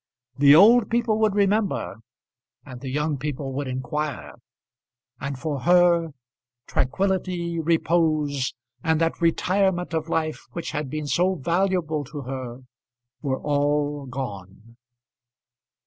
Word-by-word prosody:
The 140 0 +8
old 220 +6 +7
people 230 -2 +1
would 215 -2 +2
remember 200 - +1 0.7
and 130 -3 -10
the 135 - -5
young 150 +1 -1
people 140 -1 -4
would 140 +1 -3
inquire; 130 +3 -4 0.9
and, 140 0 -4
for 145 +1 -3
her, 175 +3 +4 0.6
tranquillity, 175 +2 -1
repose, 155 -4 +1 0.3
and 160 -1 +2
that 165 +1 0
retirement 180 +1 +1
of 160 0 -2
life 155 -2 -2
which 170 - -4
had 150 -3 -3
been 155 +2 -4
so 180 +6 +1
valuable 170 -1 0
to 145 +1 -7
her, 130 -1 -6 0.6
were 130 -2 -1
all 145 -1 0
gone. 115 -4 -7
155 Hz, 115 wpm, -24 LUFS, 140-175 Hz, 0.9 s, The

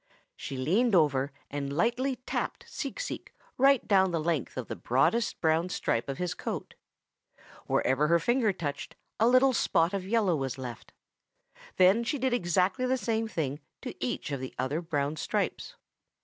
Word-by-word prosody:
"She 135 - -6
leaned 195 - +2
over 140 -4 +3 0.2
and 140 -1 -3
lightly 250 +6 +1
tapped 250 - -4
Seek - - -5
Seek - - -5 0.2
right 270 -1 +4
down 190 -2 +4
the 170 -2 -1
length 155 -4 -2
of 125 - -4
the - - -4
broadest 210 - +1
brown 160 +2 +2
stripe 120 -7 -1
of 135 - -3
his 180 -1 -2
coat. - - -5 0.9
Wherever 135 +4 +2
her 170 +2 +5
finger 235 +5 +2
touched 145 -6 -5 0.2
a 225 - +5
little 255 +2 +5
spot 170 -5 +2
of 190 -2 -3
yellow 205 -5 +2
was 135 -3 -3
left. 125 -3 -8 0.8
Then 190 +5 +5
she 255 +5 -1
did 260 -1 0
the 220 +6 +1
same 225 -2 -1
thing 150 -8 -3 0.2
to - - -5
each 125 - -3
of 140 - -2
the 130 0 -7
other 130 +6 -1
brown 150 -3 -2
stripes. - - -2
175 Hz, 165 wpm, -29 LUFS, 140-230 Hz, 0.9 s, her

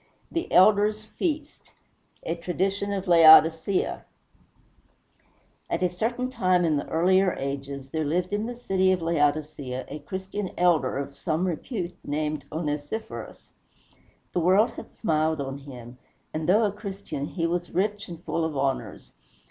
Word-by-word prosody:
THE 335 - -3
ELDER'S 210 +3 +4
FEAST 300 +5 -4 0.5
A - - -1
TRADITION 190 +4 -2
OF 195 -1 -2
LAODICEA 165 +2 +6 1.7
At - - -1
a 180 - +3
certain 240 +8 -2
time 185 -7 +2
in 155 -3 +2
the 140 - -4
earlier 185 +3 +3
ages 140 0 -5
there 160 -1 -1
lived 175 +6 -1
in 210 +2 -1
the 245 - -5
city 190 -5 +1
of 180 -3 0
Laodicea 145 -4 -1
a 150 - -6
Christian 190 +5 -5
elder 165 -8 +2
of 140 0 -5
some 165 +1 -1
repute, 180 - -4
named 150 +1 -2
Onesiphorus. 150 +6 -5 0.8
The - - +1
world 190 +7 +4
had - - -10
smiled 155 -4 0
on 135 0 -4
him, 125 -3 -11 0.3
and 155 +1 -2
though 210 +5 +5
a 210 - +2
Christian, 195 -8 -6
he 165 0 -2
was 175 +1 -1
rich 205 +3 -1
and 170 -1 -9
full 165 - -1
of 160 -3 -2
honors. 135 -1 -3
175 Hz, 145 wpm, -26 LUFS, 150-195 Hz, 1.7 s, LAODICEA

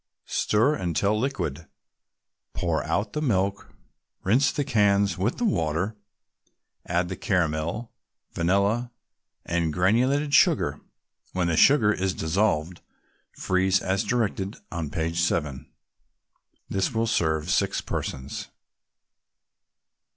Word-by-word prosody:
Stir 115 +8 +2
until 100 - 0
liquid. 95 - -3 0.9
Pour 85 -2 -1
out 100 +7 -1
the 150 - -2
milk, 100 -7 0 0.5
rinse 130 +9 +3
the 145 - -1
cans 100 - +2
with 95 +7 -1
the 245 - 0
water, 90 - 0 0.9
add 90 0 0
the 95 - -4
caramel, 85 +3 -1 0.4
vanilla 100 +7 +1 0.6
and 85 -2 0
granulated 125 - +2
sugar. - - +3 0.5
When 90 -2 0
the 80 - +1
sugar 110 - +5
is 95 -1 -1
dissolved, 85 -1 0 0.5
freeze 95 +1 +1
as 95 +1 0
directed 105 -4 -1
on 85 -5 -3
page 80 +2 -2
7. 75 -6 -1 1.0
This 95 +4 -1
will 115 +1 +2
serve 80 -5 0
six 100 0 +1
persons. 65 +1 -5
95 Hz, 105 wpm, -25 LUFS, 85-110 Hz, 1.0 s, sugar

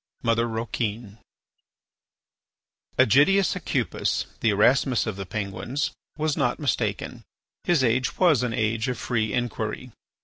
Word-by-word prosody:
MOTHER 115 0 +2
ROUQUIN 110 -1 -4 1.8
Ægidius 175 - +4
Aucupis, - - -1
the 115 - +2
Erasmus 120 +4 +3
of 110 - -3
the 95 -1 -6
Penguins, 110 - -3 0.3
was 155 -1 0
not 125 -5 0
mistaken; 145 -4 -2 0.4
his 170 -6 +3
age 125 +1 +1
was 170 -9 +4
an 125 -2 -1
age 110 0 0
of 125 -2 -2
free 110 -3 -1
inquiry. 120 0 -3
120 Hz, 115 wpm, -25 LUFS, 110-135 Hz, 1.8 s, Ægidius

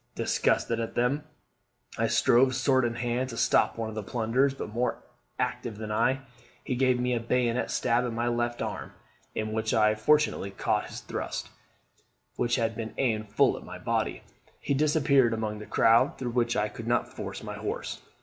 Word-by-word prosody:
Disgusted 115 0 +1
at 115 -1 -4
them, 135 +5 +1 0.7
I 115 0 +1
strove, 130 +3 +4
sword 130 0 +3
in 120 0 -1
hand, 120 +2 -1
to 115 - -7
stop - - +3
one 115 -1 -2
of 110 - -6
the 110 - -3
plunderers; 120 +6 +1
but, 105 -5 -6
more 120 +2 0 0.4
active 110 -3 -2
than 110 0 -5
I, 130 +5 +2 0.4
he - - -2
gave 130 -1 +2
me 125 0 +1
a 120 - +1
bayonet 120 +1 0
stab 120 +1 +1
in 120 -2 -3
my 120 +1 0
left 120 0 -1
arm, - - -5 0.4
in 110 0 -2
which 110 0 0
I 105 -1 +4
fortunately 110 -1 +2
caught 95 - -1
his - - -8
thrust, - - -4 0.9
which 120 -1 +1
had 115 -2 0
been 110 -1 -5
aimed 110 -5 0
full 105 - +3
at - - -9
my - - -8
body. - - -2 0.4
He - - -1
disappeared 140 -4 +3
among 110 -1 -3
the 105 - -9
crowd, 115 +4 +4
through 125 -2 -3
which 120 -1 +1
I 105 - +2
could 115 +2 -8
not 120 0 0
force - - -6
my - - -5
horse. - - -4
120 Hz, 190 wpm, -28 LUFS, 110-125 Hz, 0.9 s, strove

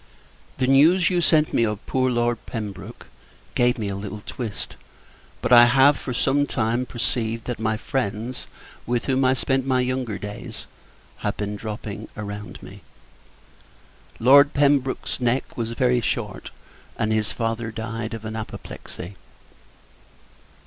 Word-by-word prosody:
The 130 - +1
news 160 +8 +5
you 175 -1 +2
sent 155 -2 +3
me, 115 - +3
of 105 -2 -2
poor 130 -1 +1
Lord 120 -1 0
Pembroke, 105 -5 -6 0.5
gave 120 0 +3
me 110 -3 -2
a 100 - -3
little 105 +1 -6
twist; 115 -7 -5 0.7
but - - +3
I 120 0 +10
have, 135 +4 +6
for 130 - -6
some 140 +4 +2
time, 120 +1 0
perceived, 115 -2 -2
that 125 -3 -4
my 110 0 0
friends, 115 0 -3 0.4
with 120 0 0
whom 135 0 +2
I 130 0 +4
spent 135 0 0
my 130 -1 +3
younger 125 -4 -1
days, 110 +3 -7 0.5
have - - -2
been 105 0 -3
dropping 105 -1 -6
around 105 0 -7
me. - - -11 1.4
Lord 140 +4 +6
Pembroke's 140 -2 +2
neck 125 +1 0
was 115 -1 -3
very 125 0 +2
short, 105 -3 -3 0.5
and 110 0 +1
his 105 -3 0
father 115 +3 -2
died 115 0 -4
of 110 -1 -8
an 110 0 -4
apoplexy. 100 -3 -8
120 Hz, 140 wpm, -24 LUFS, 110-130 Hz, 1.4 s, I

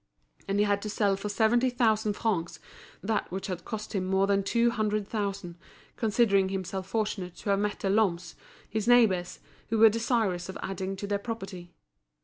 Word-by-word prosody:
And 195 +1 0
he 205 - +4
had 200 -1 +1
to 210 - -4
sell 205 -1 +1
for 200 +2 -5
seventy 235 +4 +3
thousand 220 -3 +1
francs 170 -7 -2 0.4
that 215 -2 -1
which 190 +1 -4
had 180 -3 -5
cost 215 -1 -6
him 195 -3 0
more 190 +1 +2
than 200 0 +2
two 235 +4 +2
hundred 215 -3 -1
thousand, 200 -5 -4 0.4
considering 205 -4 +2
himself 190 0 -4
fortunate 200 -5 -2
to 200 - -3
have 195 - +2
met 205 0 -2
the 195 - 0
Lhommes, 180 -5 +1 0.3
his 220 +1 -3
neighbours, 210 -8 +3 0.3
who 225 - +1
were 220 0 +8
desirous 220 -5 0
of 190 - -6
adding 190 0 -3
to 200 - -6
their 200 0 -1
property. 195 -6 -7
200 Hz, 180 wpm, -28 LUFS, 190-220 Hz, 0.4 s, were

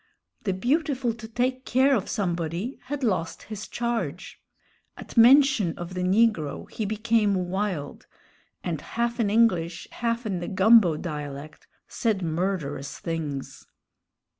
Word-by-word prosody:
The 195 - +1
"beautiful 260 - 0
to 220 0 -9
take 250 +3 -1
care 265 +2 +3
of 205 - -2
somebody" 175 - -2
had 280 +1 -4
lost 185 -8 -1
his 205 -3 -7
charge. 235 -1 -3 0.6
At - - -11
mention 245 - +6
of 175 +1 -6
the 180 - -3
negro 185 -5 +1
he 220 - -3
became 215 -1 +1
wild, 185 -4 -3 0.6
and 165 -4 -3
half 235 +1 -2
in 215 -3 +2
English, 185 -7 +2
half 235 0 -2
in 190 -4 -2
the 175 - -5
"gumbo" 190 -4 +5
dialect, 150 -2 -7 0.2
said 215 -5 -1
murderous 160 -5 -2
things. 155 -5 -5
205 Hz, 130 wpm, -26 LUFS, 170-235 Hz, 0.6 s, mention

